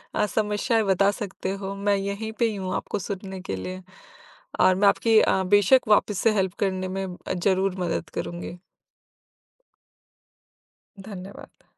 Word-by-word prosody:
अ, 210 - +2
समस्याएँ 210 +2 0
बता 195 0 +3
सकते 195 -2 -5
हो। 195 +1 -4
मैं 200 0 +1
यहीं 200 +3 -3
पे 235 - +4
ही 215 - -4
हूँ 190 -2 -4
आपको 205 - -3
सुनने 190 0 -6
के 95 - -4
लिए। 185 - -6 0.8
और 185 - +5
मैं 200 +2 +3
आपकी 225 +2 +4
अ, 190 - +2
बेशक 205 +6 +4
वापस 210 -1 +3
से 225 - +3
हेल्प 190 -3 0
करने 185 -2 -1
में 195 +1 -3
अ, 180 0 -6
ज़रूर 190 +1 +1
मदद 170 -2 -2
करूँगी। 175 0 -5 2.4
धन्यवाद। 195 -1 -11
195 Hz, 150 wpm, -25 LUFS, 185-205 Hz, 2.4 s, और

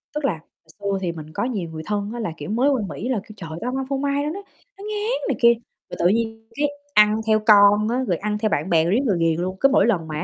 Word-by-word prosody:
Tức 300 -1 -1
là 215 - +2
hồi 160 0 -17
xưa 200 -1 -1
thì 175 - -1
mình 160 -2 -8
có - - -2
nhiều 205 -10 -3
người 160 0 -7
thân 205 0 -2
á 240 - -5
là, 195 -7 -3
kiểu, 145 - -7
mới 245 +6 +2
qua 265 -5 +1
Mỹ 230 - -5
là 245 -6 0
kêu: 215 - -13
"Trời, 165 -4 -8
tao 250 +2 -2
hông 265 - -3
ăn 270 - -2
phô 275 - 0
mai, 280 +1 0
nó 295 - -1
nó 370 +6 -5 0.4
nó 395 - -11
ngán" 440 +4 -2
này - - 0
kia, 235 0 +7 0.4
rồi - - -7
tự 175 - +4
nhiên 225 +2 -1
cái 295 +1 +1 0.3
ăn 210 0 +5
theo 215 0 +4
con 205 0 +6
á, 255 +2 0
rồi 175 -4 +1
ăn 210 0 -2
theo 215 0 0
bạn 155 +1 -1
bè 160 -2 +4
rồi 170 +3 +1
riết 240 - +3
rồi 195 -5 +2
ghiền 165 0 +1
luôn, 185 +1 -3
cứ 275 - +5
mỗi 240 -6 +4
lần 180 -9 0
mà, 155 - -5
á - - -2
215 Hz, 310 wpm, -22 LUFS, 180-255 Hz, 0.4 s, kia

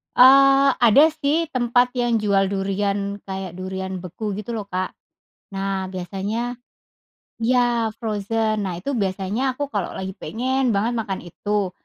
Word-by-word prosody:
Eee, 275 +1 +7
ada 240 +6 +6 0.2
sih, 315 +4 +2
tempat 245 +1 +2
yang 240 -2 +1
jual 200 -2 +2
durian, 200 +1 -1
kayak 190 -2 -6
durian 190 +1 -5
beku 195 +3 -4
gitu, 210 +3 -6
lho, 215 -3 -4
Kak. 185 -1 -2 0.6
Nah, 195 -1 -2
biasanya 200 +7 -4 0.8
ya 235 -2 +1
frozen. 215 0 -1
Nah, 185 - -3
itu 280 - -2
biasanya 200 +6 -1
aku 285 +1 -4
kalau 205 -7 -3
lagi 190 0 -4
pengen 255 +1 0
banget 215 +4 +1
makan 205 -4 -3
itu. 200 +3 -2
210 Hz, 135 wpm, -22 LUFS, 195-245 Hz, 0.8 s, Eee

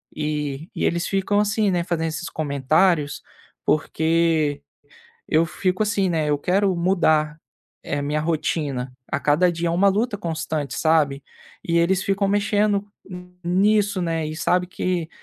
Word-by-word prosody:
E 150 0 -3
e - - -2
eles 170 +1 0
ficam 195 +1 +1
assim, 210 0 +1
né, 175 -2 0
fazendo 165 -2 -1
esses 165 +2 -5
comentários, 150 +2 +1 0.4
porque 160 -1 +1 0.7
eu 165 +1 +2
fico 185 +5 -1
assim, 200 -3 +1
né, 155 -3 0
eu 145 - +2
quero 190 +4 +1
mudar 160 -4 +2 0.5
a 145 0 -1
minha 150 +2 -1
rotina 145 -5 -2 0.2
a 140 - -1
cada 160 +5 +3
dia, 170 0 -2
eh, - - 0
uma 185 +4 +2
luta 205 +1 0
constante, 160 -5 -3
sabe. 150 -4 +2 0.4
E 170 0 +1
eles 185 +2 +2
ficam 200 0 0
mexendo 205 0 +1 0.6
nisso, 200 +1 +2
né, 165 -2 -1
e 155 - -5
sabe 180 +3 +1
que 180 -2 -2
170 Hz, 145 wpm, -22 LUFS, 155-190 Hz, 0.7 s, cada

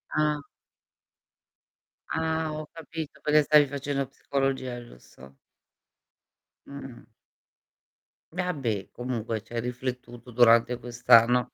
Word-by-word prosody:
Ah. 150 -1 +1 1.7
Ah, 160 0 -1
ho 155 0 -6
capito 160 -1 -7
perché 150 0 +4
stavi 150 0 +5
facendo 140 0 -3
psicologia, 135 -2 -2
giusto? 65 - -16 1.3
Mh-mh. 135 -5 -10 1.3
Vabbè, 140 - -2
comunque 115 -3 -3
c'hai 115 +3 -5
riflettuto 125 0 -6
durante 120 0 +5
quest'anno, 120 0 +4
125 Hz, 85 wpm, -27 LUFS, 120-150 Hz, 1.7 s, stavi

